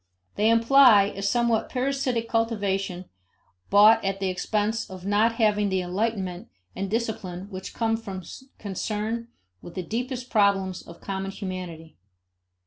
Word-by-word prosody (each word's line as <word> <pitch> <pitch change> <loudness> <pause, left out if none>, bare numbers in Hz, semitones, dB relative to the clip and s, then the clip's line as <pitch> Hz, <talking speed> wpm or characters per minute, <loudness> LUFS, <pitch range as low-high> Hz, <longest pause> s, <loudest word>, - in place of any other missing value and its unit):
They 215 +2 +2
imply 230 -3 +6
a 195 - -5
somewhat 230 +2 +1
parasitic 255 -3 -1
cultivation 200 -5 -1 0.6
bought 210 +3 +6
at 195 0 -1
the 190 -1 0
expense 210 +4 -1
of 185 -1 -9
not 210 +3 +3
having 210 -3 +2
the 190 -1 0
enlightenment 185 -1 -2 0.3
and 195 - -3
discipline 200 -5 -3
which 190 0 -7
come 225 -1 +1
from 195 -5 -6 0.3
concern 215 +3 -3 0.3
with 175 - -11
the 185 - -3
deepest 245 +5 -4
problems 195 -3 +2
of 170 - -14
common 195 0 -4
humanity. 180 -5 -7
205 Hz, 135 wpm, -25 LUFS, 190-230 Hz, 0.6 s, imply